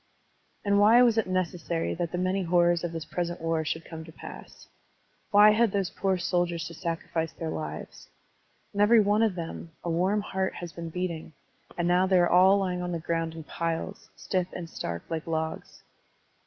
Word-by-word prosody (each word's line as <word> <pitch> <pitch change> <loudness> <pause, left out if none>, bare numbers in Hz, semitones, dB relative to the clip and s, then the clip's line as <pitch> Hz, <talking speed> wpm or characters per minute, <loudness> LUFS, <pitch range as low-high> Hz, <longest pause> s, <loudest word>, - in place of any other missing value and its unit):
And 200 0 +3
why 225 +4 +7
was 230 -2 +4
it 220 - -1
necessary 175 -2 -1
that 170 -1 -3
the 175 - -2
many 185 +2 0
horrors 175 -1 +3
of 175 - -2
this 165 -2 -5
present 175 +1 -3
war 165 -1 0
should 160 +2 -3
come 160 -1 -8
to 160 - -12
pass? - - -11 0.6
Why 210 +1 +7
had 220 0 +3
those 195 -2 -1
poor 190 -1 0
soldiers 175 -2 0
to - - -10
sacrifice 165 -1 -3
their 160 -1 -4
lives? 75 -1 -7 0.6
In 205 - 0
every 225 +2 +6
one 210 +1 +3
of 220 -5 +2
them 165 -1 -6
a 170 - -2
warm 185 +5 +1
heart 190 -2 -2
has 175 -2 -7
been 170 -1 -6
beating, 170 -2 -4 0.4
and 175 -1 0
now 180 +1 +3
they 190 -1 +4
are 175 -1 +5
all 185 +3 +6
lying 180 -2 -1
on 180 0 -3
the 170 - -2
grotmd 165 0 -2
in 160 - -7
piles, 165 +6 -4
stiff 185 -2 -1
and 175 -2 -6
stark 85 - -5
like 165 0 -4
logs. 160 -1 -4
175 Hz, 195 wpm, -28 LUFS, 165-190 Hz, 0.6 s, why